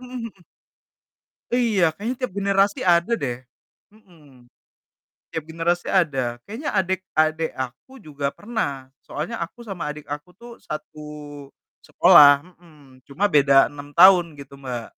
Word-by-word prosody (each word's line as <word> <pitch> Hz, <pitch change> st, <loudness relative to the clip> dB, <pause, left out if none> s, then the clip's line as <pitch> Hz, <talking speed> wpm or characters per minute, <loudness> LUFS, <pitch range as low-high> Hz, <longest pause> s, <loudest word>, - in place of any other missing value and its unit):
Mhm 250 Hz, 0 st, -12 dB, 0.2 s
mhm. 190 Hz, -4 st, -23 dB, 1.1 s
Iya, 205 Hz, -10 st, +2 dB
kayaknya 230 Hz, +5 st, -4 dB
tiap 255 Hz, -7 st, -4 dB
generasi 200 Hz, 0 st, +1 dB
ada 175 Hz, +4 st, +3 dB
deh. 120 Hz, -2 st, -2 dB, 0.6 s
Mhm, 145 Hz, -, -22 dB, 0.8 s
tiap 160 Hz, -, -5 dB
generasi 165 Hz, +2 st, -2 dB
ada. 135 Hz, -10 st, 0 dB
Kayaknya 230 Hz, -, -6 dB
adek 190 Hz, -1 st, 0 dB
adek 155 Hz, +1 st, +1 dB
aku 130 Hz, -, -7 dB
juga 145 Hz, -4 st, -7 dB
pernah, 145 Hz, -, -4 dB, 0.2 s
soalnya 150 Hz, +3 st, -5 dB
aku 240 Hz, -, -17 dB
sama 195 Hz, -7 st, -7 dB
adik 150 Hz, -1 st, -13 dB
aku 150 Hz, +4 st, -6 dB
tuh, 235 Hz, +5 st, -14 dB
satu 155 Hz, 0 st, -8 dB, 0.9 s
sekolah 145 Hz, -1 st, +7 dB, 0.3 s
mhm, 145 Hz, -7 st, -20 dB
cuma 195 Hz, +9 st, 0 dB
beda 140 Hz, -3 st, +4 dB
6 145 Hz, 0 st, -12 dB
tahun 180 Hz, 0 st, +7 dB, 0.2 s
gitu, 140 Hz, 0 st, -13 dB
Mbak. 125 Hz, -4 st, -6 dB
160 Hz, 130 wpm, -22 LUFS, 140-195 Hz, 1.1 s, sekolah